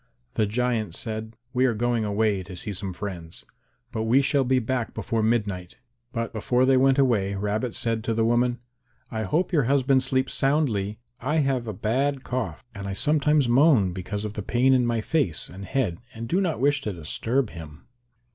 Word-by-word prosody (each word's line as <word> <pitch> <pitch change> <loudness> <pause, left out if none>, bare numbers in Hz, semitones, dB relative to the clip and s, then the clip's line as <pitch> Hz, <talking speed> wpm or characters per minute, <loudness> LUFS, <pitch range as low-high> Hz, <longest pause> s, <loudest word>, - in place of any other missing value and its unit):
The 110 - +1
giant 110 -4 -1
said, 110 0 -4 0.2
"We 130 0 +3
are 120 - 0
going 120 0 0
away 105 -1 +1
to 95 0 -9
see 100 +3 -4
some 95 0 -3
friends, 90 -3 -7 0.5
but 110 -2 -2
we 130 +5 +4
shall 140 0 +2
be 130 +1 +2
back 125 -1 -2
before 115 -1 -1
midnight." 105 -6 -1 0.3
But 115 -1 -3
before 125 +3 +2
they 135 0 +4
went 135 +1 +4
away 110 -8 +2
Rabbit 105 +4 -2
said 115 -3 -1
to 115 - 0
the 115 0 +2
woman, 120 +1 +2 0.5
"I 110 -2 -2
hope 170 - 0
your 145 -6 +3
husband 135 0 +3
sleeps 130 +1 0
soundly; 120 -8 +1 0.2
I 140 +6 -1
have 130 -3 0
a 110 - -3
bad 130 +7 0
cough 125 -2 -4
and 100 -1 -6
I 100 - -3
sometimes 150 +3 +2
moan 120 - +4
because 100 +3 -4
of 105 - -4
the 105 - -4
pain 125 +5 +3
in 125 -2 +3
my 115 -1 0
face 110 - 0
and 95 +2 -9
head 110 -7 -1 0.2
and 115 - -6
I - - -2
do 175 +12 +1
not 175 -4 -1
wish 140 +2 +2
to 105 -6 -3
disturb 110 - -1
him." 80 -2 -10
115 Hz, 195 wpm, -25 LUFS, 105-130 Hz, 0.5 s, we